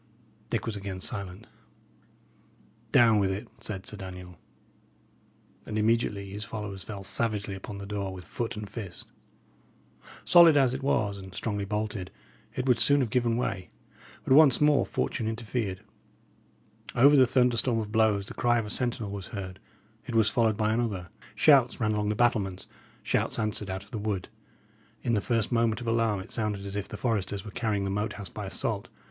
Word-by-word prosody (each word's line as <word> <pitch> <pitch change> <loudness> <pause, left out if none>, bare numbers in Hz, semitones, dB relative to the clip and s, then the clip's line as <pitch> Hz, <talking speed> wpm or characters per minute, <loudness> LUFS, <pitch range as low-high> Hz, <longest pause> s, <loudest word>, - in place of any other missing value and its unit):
Dick 115 - -1
was 115 -2 -3
again 100 -2 -5
silent. 100 0 -4 1.5
"Down 115 -3 +6
with 100 -1 +2
it," 100 +5 -4
said 95 -3 -6
Sir 105 - -5
Daniel. 90 -2 -9 1.2
And 110 - -4
immediately 105 -3 +1
his 105 +1 -4
followers 105 -3 -6
fell 100 -3 -7
savagely 105 -1 -1
upon 95 +1 -7
the 100 - -7
door 100 -1 -3
with 90 -1 -9
foot 115 -1 -4
and 105 -1 -5
fist. 100 -4 -7 1.1
Solid 170 -4 +8
as 130 -3 +4
it 130 - -4
was, 105 -7 0
and 95 -1 -11
strongly 105 -2 -2
bolted, 105 -2 -3 0.5
it 130 - -2
would 125 -3 +4
soon 145 0 +4
have 120 -5 -1
given 120 -2 +1
way; 95 -6 -2 0.5
but - - +2
once 145 -3 +7
more 150 -1 +4
fortune 115 - -2
interfered. 110 -4 -3 1.1
Over 140 +4 +7
the 130 -2 +6
thunderstorm 125 -1 +2
of 105 -2 -3
blows 110 -3 +2
the - - -8
cry 120 0 +2
of 115 - -1
a 105 - -5
sentinel 120 -4 -1
was 100 -2 -6
heard; 95 -3 -7 0.5
it 120 - -4
was 110 -1 +4
followed 110 -3 +2
by 110 0 +1
another; 105 -7 -2 0.3
shouts 130 +1 +5
ran 110 -2 +1
along 105 -1 0
the 105 - 0
battlements, 105 -6 +1 0.4
shouts - - 0
answered 105 -2 -2
out 95 +1 -4
of 100 - -20
the 110 - -4
wood. 100 -3 -3 0.7
In 120 - +1
the 105 - +2
first 115 0 0
moment 115 -2 +2
of 120 - -7
alarm 115 -3 +1
it - - -11
sounded 105 -3 -2
as 100 0 -5
if 100 - -3
the 105 - -7
foresters 100 -4 -1
were 105 - -7
carrying 105 -2 -1
the 95 - -2
Moat 105 +2 -1
House 100 -3 -8
by - - -6
assault. - - -2
105 Hz, 180 wpm, -28 LUFS, 100-115 Hz, 1.5 s, Solid